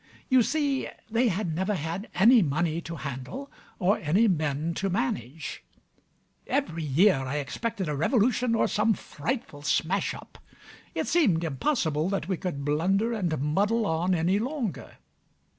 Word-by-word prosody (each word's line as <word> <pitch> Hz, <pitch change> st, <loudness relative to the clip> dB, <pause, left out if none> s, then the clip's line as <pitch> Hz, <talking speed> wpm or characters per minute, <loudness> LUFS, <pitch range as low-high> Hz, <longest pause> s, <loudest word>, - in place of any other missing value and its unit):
You 260 Hz, -2 st, +6 dB
see 285 Hz, +1 st, 0 dB, 0.2 s
they 235 Hz, +2 st, +3 dB
had 185 Hz, -4 st, -1 dB
never 190 Hz, +5 st, 0 dB
had 170 Hz, +6 st, -4 dB
any 230 Hz, +5 st, +7 dB
money 165 Hz, +1 st, 0 dB
to 165 Hz, 0 st, -7 dB
handle 145 Hz, -, -6 dB, 0.3 s
or 195 Hz, +1 st, +2 dB
any 185 Hz, +9 st, +3 dB
men 155 Hz, -2 st, 0 dB
to 195 Hz, +3 st, -1 dB
manage. 135 Hz, -, -3 dB, 0.8 s
Every 170 Hz, -, -1 dB
year 155 Hz, +5 st, +4 dB
I 135 Hz, +1 st, -3 dB
expected 190 Hz, -, -3 dB
a 150 Hz, -, -1 dB
revolution, 235 Hz, -, +2 dB
or -, -, +2 dB
some 215 Hz, +1 st, +2 dB
frightful 155 Hz, -, -5 dB
smash 170 Hz, +6 st, 0 dB
up: -, -, -13 dB, 0.6 s
it -, -, 0 dB
seemed 210 Hz, -, +3 dB
impossible 160 Hz, -, 0 dB
that 195 Hz, -4 st, -2 dB
we 190 Hz, -, 0 dB
could 150 Hz, -6 st, -4 dB
blunder 190 Hz, +10 st, +1 dB
and 175 Hz, -8 st, -1 dB
muddle 200 Hz, -, +1 dB
on 175 Hz, +1 st, +1 dB
any 175 Hz, +4 st, +2 dB
longer. 250 Hz, -, -3 dB
180 Hz, 145 wpm, -27 LUFS, 155-225 Hz, 0.8 s, any